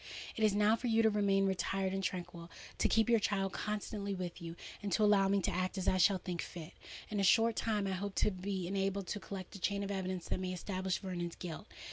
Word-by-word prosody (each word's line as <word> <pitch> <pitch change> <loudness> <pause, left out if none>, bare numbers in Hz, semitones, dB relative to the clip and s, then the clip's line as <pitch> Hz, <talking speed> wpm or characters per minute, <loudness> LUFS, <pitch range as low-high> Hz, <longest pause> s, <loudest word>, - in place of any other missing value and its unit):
It 220 - -1
is 210 -2 +4
now 210 +1 +5
for 245 +2 -4
you 225 -1 +4
to 220 - +5
remain 200 -1 +3
retired 190 0 0
and 195 0 -2
tranquil—to 175 -2 -3
keep 225 0 +3
your 235 -1 +5
child 195 -2 0
constantly 205 -1 -3
with 180 -2 -5
you—and 170 +4 -7
to 215 - +3
allow 205 -2 +5
me 200 0 +2
to - - +1
act 185 +2 -1
as 185 - -2
I 185 - +4
shall 190 +2 +5
think 180 -2 -4
fit. 165 -1 -8 0.4
In 210 - -2
a - - +2
short 225 +4 +5
time 210 -3 0
I 195 - -1
hope 195 +1 -3
to - - +3
be 190 -1 -3
enabled 195 +1 -1
to 210 - -2
collect 190 -2 -7
a - - -7
chain 200 +2 0
of 200 - -3
evidence 185 -2 -3
that - - 0
may 185 0 -2
establish 185 0 -2
Vernon's 175 -3 -4
guilt. 170 -3 -7
195 Hz, 230 wpm, -34 LUFS, 185-205 Hz, 0.4 s, now